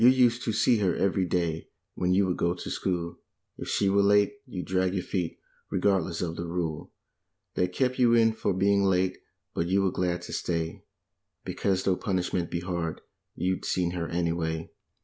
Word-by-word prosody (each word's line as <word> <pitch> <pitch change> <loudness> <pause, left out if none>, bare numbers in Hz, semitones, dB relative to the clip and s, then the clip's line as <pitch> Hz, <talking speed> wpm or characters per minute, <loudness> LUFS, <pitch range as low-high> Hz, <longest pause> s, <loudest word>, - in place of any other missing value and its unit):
USED 125 -1 +5
to 115 - +1
see 115 +2 +3
her 95 -4 +2
every 95 -1 +1
day 85 -2 -1 0.2
when 90 0 0
you 95 +2 +4
would 90 -1 0
go 85 +1 +1
to - - -6
school; 85 -2 -2 0.4
If - - -5
she 100 - +1
were 100 +1 +4
late 100 0 +4
you'd 90 -7 -5
drag 95 0 +1
your 90 - -1
feet, 90 -4 -2 0.3
re¬ - - 0
gardless 95 -4 +1
of 85 -1 -3
the 85 - -4
rule 85 -3 -3 0.6
That 90 0 0
kept 130 +6 0
you 120 -2 +5
in 115 -1 +5
for - - -1
being 100 +1 +3
late, 95 -1 +2 0.3
but 85 - -1
you 95 +2 +2
were 95 - +2
glad 90 -1 -1
to - - -7
stay, 85 -1 -2 0.6
Because 95 -2 0
though 95 -2 +2
pun¬ 95 -2 -1
ishment 90 -1 -1
be 85 - -2
hard, 85 -3 -3 0.3
you'd 95 0 -1
seen 90 -2 0
her, 85 -2 -3
anyway. 85 -1 -1
90 Hz, 190 wpm, -28 LUFS, 85-100 Hz, 0.6 s, USED